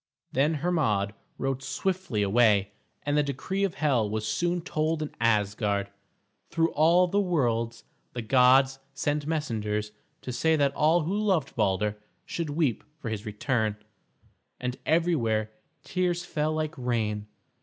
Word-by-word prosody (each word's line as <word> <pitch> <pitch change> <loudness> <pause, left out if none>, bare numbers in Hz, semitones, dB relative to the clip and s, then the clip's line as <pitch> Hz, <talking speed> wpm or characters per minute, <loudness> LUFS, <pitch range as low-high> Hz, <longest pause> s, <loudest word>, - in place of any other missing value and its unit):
Then 145 +5 +2
Hermod 135 - 0 0.2
rode 135 -1 -2
swiftly 185 - -1
away, 100 -1 +3 0.3
and 145 0 0
the 150 - +4
decree 145 +8 -2
of 195 -4 0
Hel 130 -8 +1
was 110 0 -2
soon 175 +5 0
told 155 -1 -1
in 150 - -6
Asgard. 105 -2 +1 0.6
Through 165 0 +1
all 170 +4 +5
the 200 +3 +1
worlds 120 - 0 0.3
the 120 - -4
gods 130 +3 +5 0.2
sent 145 +2 -1
messengers 105 -9 -2 0.3
to 125 - -4
say 160 +6 +2
that 140 -2 +2
all 160 +4 +3
who 170 +6 -1
loved 195 -9 0
Balder 105 0 0 0.3
should 165 -3 -3
weep 145 -6 0
for 120 - -5
his 110 0 -4
return, 110 0 0 0.8
and 125 0 -2
everywhere 120 -11 +1 0.3
tears 175 -1 -1
fell 155 -2 -1
like 155 0 -2
rain. 110 -4 -1
135 Hz, 140 wpm, -27 LUFS, 110-160 Hz, 0.8 s, all